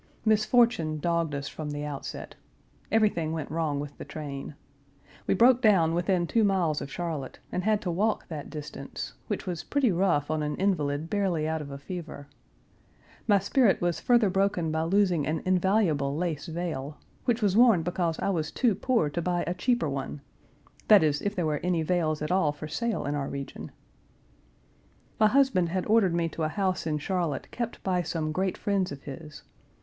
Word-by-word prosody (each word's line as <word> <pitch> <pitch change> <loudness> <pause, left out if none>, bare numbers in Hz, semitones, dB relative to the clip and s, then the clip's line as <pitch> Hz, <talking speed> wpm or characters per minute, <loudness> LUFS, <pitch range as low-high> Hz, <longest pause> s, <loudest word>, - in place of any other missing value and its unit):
Misfortune 215 -6 +3
dogged 165 -1 0
us 140 0 -4
from 155 -1 -6
the 145 0 -4
outset. 145 -2 -6 0.6
Everything 205 -8 +2
went 155 -3 -4
wrong 155 -3 -1
with 145 0 -6
the - - -5
train. 145 -2 -7 0.7
We - - +3
broke 245 +4 +5
down 185 -8 +4
within 175 +1 +1
two 225 +6 +2
miles 180 -7 +1
of 140 - -6
Charlotte, 160 -6 -4
and 180 - -2
had 215 -1 +2
to 180 - -1
walk 210 +6 0
that 155 -4 -6
distance; 150 -2 -7
which - - -3
was 175 -3 -4
pretty 275 -6 +1
rough 170 -5 +1
on 155 -1 0
an 150 0 -2
invalid 155 -6 0
barely 180 -5 0
out 160 0 -1
of 145 - -7
a 140 - -6
fever. 155 -2 -7 1.0
My 205 -2 +6
spirit 200 +3 +3
was 175 -1 0
further 235 -5 +3
broken 190 -4 +1
by 160 0 0
losing 180 -4 +2
an 155 0 -1
invaluable 180 -7 +2
lace 160 -4 -2
veil, 160 -4 -4 0.3
which 235 -2 +1
was 200 -2 +2
worn 225 -7 +6
because 175 -1 -1
I - - 0
was 160 -5 -1
too 240 -5 +2
poor 230 - +1
to 170 - -2
buy 175 0 0
a 175 - -1
cheaper 240 -3 +1
one 140 0 -4 0.7
that 210 -6 +7
is, 145 -2 +1
if 205 0 -2
there 175 - 0
were 150 -2 0
any 175 -2 0
veils 155 -3 0
at 150 - -2
all 180 -5 +3
for 150 +1 -8
sale 230 +8 -2
in 145 - -1
our 140 -2 -2
region. 140 -1 -6 1.5
My 215 - +6
husband 255 -8 +3
had 185 +1 -1
ordered 210 -5 +3
me 170 -1 +1
to 165 - -7
a 155 - +1
house 185 -1 -1
in 155 -1 0
Charlotte 165 -3 -2
kept 235 -1 -5
by 180 -2 +1
some 160 -2 -2
great 185 +3 -1
friends 195 -4 0
of 140 -1 -8
his. 150 +1 -9
170 Hz, 185 wpm, -28 LUFS, 155-200 Hz, 1.5 s, that